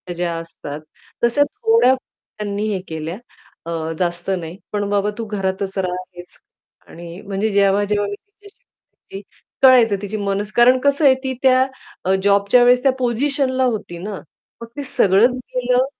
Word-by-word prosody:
ज्या 170 -1 -2
असतात 155 -3 -8 0.4
तश्या 240 +5 +4
थोड्या 450 - +3
त्यांनी 210 -4 -6
हे 190 - -2
केल्या 160 +3 -5 0.5
अ, 170 - -5 0.3
जास्त 175 +1 -2
नाही. 165 +2 -8 0.2
पण 205 -1 -1
बाबा 205 0 +1
तू 230 - -4
घरातच 195 -1 -3
रहा 180 -1 -1 0.2
हेच 175 0 -12 0.5
आणि 170 +1 -10
म्हणजे 200 +2 -2
जेव्हा-जेव्हा 200 +1 +2
मी 205 - -4
तिच्याशी 410 - -22 0.5
बोलायची, 195 - -6 0.4
कळायचं 240 -6 +6
तिची 205 +1 -4
मनस 200 +1 -2
कारण 250 +2 +5
कसं 280 +1 +2
आहे 260 -1 +7
ती 260 0 -2
त्या 260 0 +5 0.4
अ, 190 - +2
जॉबच्या 200 +4 +4
वेळेस 245 +1 +4
त्या 270 - +5
पोझिशनला 260 +2 0
होती 215 -7 -3
ना. 195 +2 -6 0.4
मग 230 - -7
ते 285 - -3
सगळंच 215 +6 +4 0.2
गेलं, 250 +1 +2
205 Hz, 155 wpm, -19 LUFS, 195-255 Hz, 0.5 s, आहे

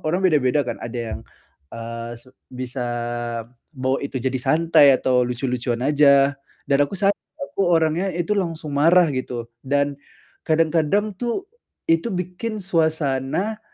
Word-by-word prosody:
orang 175 +4 +1
beda-beda, 145 -3 +3
kan. 120 - -4
Ada 120 +1 -5 0.2
yang, - - -7 0.5
eee, 115 0 -6
se 130 - -20 0.2
bisa 125 0 -5 0.9
bawa 130 0 0
itu 135 - -3
jadi 130 0 -1
santai, 155 0 +5
atau 125 -1 +2
lucu-lucuan 125 -1 -2
aja. 140 -1 +5 0.3
Dan 140 0 +2
aku 195 - -7
sadar, 200 0 +3 0.4
aku 195 -7 0
orangnya 165 +3 +2
itu 175 +5 0
langsung 165 -4 -3
marah, 165 +4 +5
gitu. 125 -2 -4 0.2
Dan, 140 +1 0 0.5
kadang-kadang, 165 +6 +2
tuh, 245 +11 -2 0.4
itu 165 +7 +2
bikin 185 +5 -4
suasana, 160 +3 0
150 Hz, 130 wpm, -22 LUFS, 130-175 Hz, 0.9 s, santai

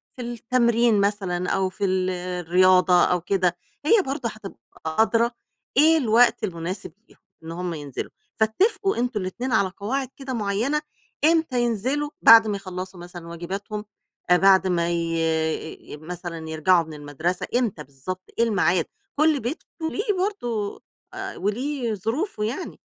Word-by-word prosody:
في 250 - -7
التمرين 235 -2 +2
مثلًا 190 -3 -1
أو 190 -1 +1
في 200 +2 -3
ال 185 -1 +1
الرياضة 180 0 +3
أو 180 -1 +1
كده، 180 -1 +1 0.3
هي 430 +6 +5
برضه 265 -3 -2
هتبقى 210 - -10 0.3
أدرى 225 +8 +2 0.5
إيه 320 +2 +6
الوقت 235 -3 +4
المناسب 180 -2 -4 0.2
ليهم - - -21 0.3
إن 160 - -7
هُم 175 +1 -3
ينزلوا، 145 -4 -6 0.3
فاتفقوا 380 - +1
أنتم 240 -3 -1
الإتنين 240 +8 -4
على 200 -4 +3
قواعد 260 +6 -2
كده 265 -2 -5
معيّنة، 225 +7 0 0.4
إمتى 320 -6 +3
ينزلوا 250 +6 0
بعد 225 -1 +9
ما 205 - -1
يخلّصوا 185 -1 -7
مثلًا 175 -1 -9
واجباتهم، 195 +5 -5 0.5
بعد 190 +1 +6
ما 170 -2 +1
ي 165 -2 -2
مثلًا 165 0 -7
يرجعوا 165 +2 +3
من 160 - -10
المدرسة 150 +4 -3
إمتى 220 -11 0
بالضبط، 140 +7 -7 0.2
إيه - - +6
الميعاد؟ 185 -6 +2 0.3
كلّ 305 0 +3
بيت 255 +8 -4 0.2
وليه 410 +7 -1
برضه 245 - -2 0.3
آآ 390 +1 -6
وليه 240 +4 -1
ظروفه 225 - -2
يعني، 245 - -4
200 Hz, 140 wpm, -24 LUFS, 175-245 Hz, 0.5 s, بعد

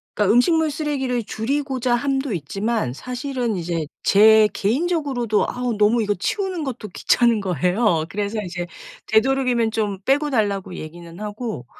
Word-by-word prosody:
그러니까 210 0 +3
음식물 315 +6 +3
쓰레기를 270 -6 -2
줄이고자 260 +2 -1
함도 270 -1 -1
있지만 195 - -2
사실은 250 - -3
이제 165 -3 -2 0.2
제 215 +1 +6
개인적으로도 260 - 0
아우 245 -3 -2
너무 215 +2 +3
이거 205 0 0
치우는 370 - -2
것도 250 -6 -5
귀찮은 230 +4 +2
거예요. 180 - +1
그래서 205 +1 -3
이제 175 -1 -5 0.4
되도록이면 240 -1 +2
좀 205 -4 -1
빼고 290 +2 +2
달라고 200 -6 -1
얘기는 170 +2 -9
하고 210 - -5
225 Hz, 355 characters per minute, -22 LUFS, 200-265 Hz, 0.4 s, 제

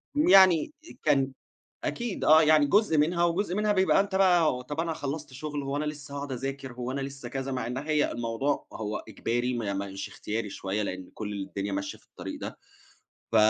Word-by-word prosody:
يعني 190 - +6 0.3
كان 135 -3 +3 0.5
أكيد 235 -4 -2
آه، 155 +1 +7
يعني 155 -1 +5
جزء 195 -2 +3
منها 170 +3 +3
وجزء 180 +2 0
منها 210 0 +2
بيبقى 190 0 +4
أنت 200 -1 -2
بقى 170 -9 +4
طب 145 +4 -3
أنا 165 -1 -1
خلّصت 145 0 -5
شُغل 145 +1 -4
هو 135 +1 -2
أنا 150 - -1
لسّه 145 -2 -6
هاقعد 140 -1 -4
أذاكر، 135 +1 -4
هو 125 +1 -5
أنا 140 - -2
لسّه 135 -2 -6
كذا، 135 +1 -3
مع 125 -3 -2
إن 125 +2 -3
هي 150 +1 +1
الموضوع 120 +4 -1
هو 105 -1 -3
إجباري 120 +4 -1
ما 105 -4 -2
مش 95 0 -4
اختياري 105 -1 -4
شوية، 100 +3 -2
لإن 95 -2 -5
كل 105 -1 -5
الدنيا 100 +1 -4
ماشية 100 0 -3
في - - -27
الطريق - - -8
ده، - - -6 0.7
ف - - -1
140 Hz, 190 wpm, -28 LUFS, 120-160 Hz, 0.7 s, آه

